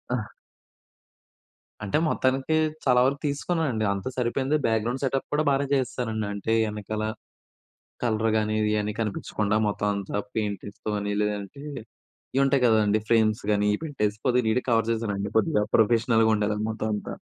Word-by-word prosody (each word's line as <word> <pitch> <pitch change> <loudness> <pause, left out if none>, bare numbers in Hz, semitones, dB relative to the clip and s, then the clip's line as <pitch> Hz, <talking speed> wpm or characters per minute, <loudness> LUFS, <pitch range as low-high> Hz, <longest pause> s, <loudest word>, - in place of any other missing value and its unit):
ఆహ్! 110 -3 -4 1.5
అంటే 100 +5 0
మొత్తానికి 130 +3 +1 0.3
చాలా 125 -1 +5
వరకు 140 +2 +1
తీసుకున్నానండి. 145 -6 -1
అంతా 100 +6 -4
సరిపోయింది. 130 +4 0
బ్యాక్‌గ్రౌండ్ 115 +4 0
సెటప్ 135 0 -1
కూడా 150 +1 +2
బాగానే 140 0 +1
చేసేసానండి. 115 -5 -2
అంటే 100 +2 -1
వెనకాల 105 0 -4 1.0
కలర్‌ 110 -1 +1
గాని 110 0 0
ఇది 105 0 +1
అని 105 0 -3
కనిపించకుండా 105 0 -1
మొత్తం 105 0 -1
అంతా 100 0 -3 0.2
పెయింటింగ్స్ 105 -1 -4
తోని, 105 -1 -1
లేదంటే 105 +5 -3 0.7
ఇవి 135 - +4
ఉంటాయి 135 -1 +3
కదండీ! 110 -2 +3
ఫ్రేమ్స్ 110 -2 +3
గాని 105 0 +2
ఇవి - - -9
పెట్టేసి 105 -8 -1
కొద్దిగా 125 -2 +2
నీట్ 125 +3 +2
కవర్ 115 -1 +2
చేశానండి. 105 -3 -2
కొద్దిగా 105 -1 +2
ప్రొఫెషనల్‌గా 115 0 +4
ఉండేదండి 105 +1 -1
మొత్తం 110 0 -3
అంతా. 105 - -6
110 Hz, 140 wpm, -26 LUFS, 105-125 Hz, 1.5 s, చాలా